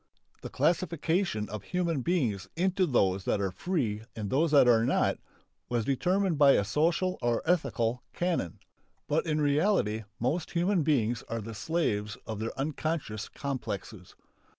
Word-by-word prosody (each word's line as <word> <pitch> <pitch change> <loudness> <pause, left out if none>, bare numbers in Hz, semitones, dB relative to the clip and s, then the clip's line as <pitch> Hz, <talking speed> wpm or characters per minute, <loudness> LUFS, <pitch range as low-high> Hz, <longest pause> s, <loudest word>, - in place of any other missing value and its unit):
The - - -6
classification 165 - 0
of 105 -1 -5
human 170 - -1
beings 120 - 0
into 185 +1 +1
those 95 - +2
that - - +1
are 95 -2 -1
free 115 - -2
and 105 -3 -4
those 155 +5 +3
that 145 -4 +6
are 115 -2 +5
not - - +1 0.5
was 120 -3 0
determined 180 +4 +1
by 140 -2 +7
a - - +3
social 165 - +1
or 120 -1 0
ethical 125 -9 0
canon. 175 - -1 0.5
But 160 +3 0
in 155 -1 +1
reality 145 - +1
most 150 +8 -1
human 175 +2 +2
beings 120 -6 +1
are 115 - -2
the 115 +1 -7
slaves 105 - -1
of 110 -2 -5
their 115 +1 -4
unconscious 140 -6 -3
complexes. 110 -8 -5
140 Hz, 150 wpm, -29 LUFS, 110-170 Hz, 0.5 s, by